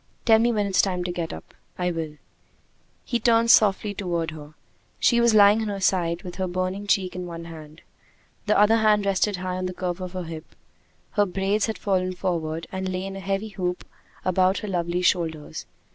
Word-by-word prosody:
"Tell 225 -2 +6
me 235 +1 +3
when 210 -3 0
it's 195 -2 +3
time 180 -2 -1
to 175 - -3
get 170 -2 -4
up." 80 - -10 0.2
"I 180 0 0
will." 160 -3 -5 0.9
He 240 - -1
turned 230 0 +4
softly 205 -1 +4
toward 170 -5 -2
her. 155 -1 -11 0.4
She 235 -1 +4
was 235 -2 +4
lying 205 +1 +6
on 220 - -2
her 200 -1 -3
side, 175 -3 +1
with 180 -1 -8
her 190 -1 -1
burning 185 +3 -3
cheek 190 -3 +1
in 180 -1 -5
one 170 -1 -7
hand. 155 -1 -11 0.6
The 210 - +3
other 210 +2 +5
hand 210 -2 +3
rested 200 +1 +1
high 185 0 -4
on 185 0 -2
the 180 - -6
curve 180 0 -3
of 185 0 -6
her 185 -1 -4
hip. 160 -1 -9 0.6
Her 205 -2 +2
braids 195 +4 0
had 220 - -3
fallen 185 -2 0
forward, 165 -3 -2
and 190 0 -3
lay 185 0 -3
in 195 0 -6
a - - -6
heavy 195 +2 -3
loop 180 0 -2 0.4
about 185 +1 +2
her - - -5
lovely 175 -1 -1
shoulders. 165 -4 -1
185 Hz, 205 wpm, -24 LUFS, 175-205 Hz, 0.9 s, Tell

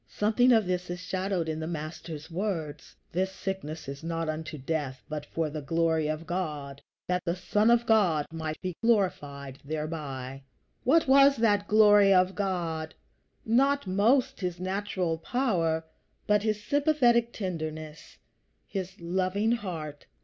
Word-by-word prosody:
Something 225 +4 +3
of 220 -3 +5
this 180 0 -2
is 175 0 -4
shadowed 185 -1 -2
in 155 0 -2
the 160 - -4
Master's 160 0 -6
words: 165 -6 -4 0.2
"This 190 +2 0
sickness 190 -6 -5
is 140 +2 -7
not 165 -1 -2
unto 155 0 -4
death, 135 -2 -3
but 150 -1 -5
for 165 -1 -1
the 150 0 -5
glory 160 +1 +1
of 155 +1 -3
God, 150 -6 -4 0.3
that 180 0 0
the 170 -1 -1
Son 210 +4 +2
of 235 0 +4
God 180 -10 +3
might 160 -1 -4
be 185 -2 -4
glorified 145 - 0
thereby." 140 -3 -5 0.4
What 310 +5 +4
was 275 +1 +7
that 205 -4 +2
glory 205 -2 +6
of 185 0 +4
God? 170 -6 -2 0.5
Not 275 +4 +3
most 215 +8 +2
his 180 -3 -3
natural 185 -3 -2
power, 165 -8 0 0.4
but 210 0 +3
his 215 -1 -1
sympathetic 250 -5 +3
tenderness, 155 -6 -6 0.5
his 190 -1 -5
loving 185 +5 0
heart. 165 -10 -4
180 Hz, 140 wpm, -28 LUFS, 155-205 Hz, 0.5 s, was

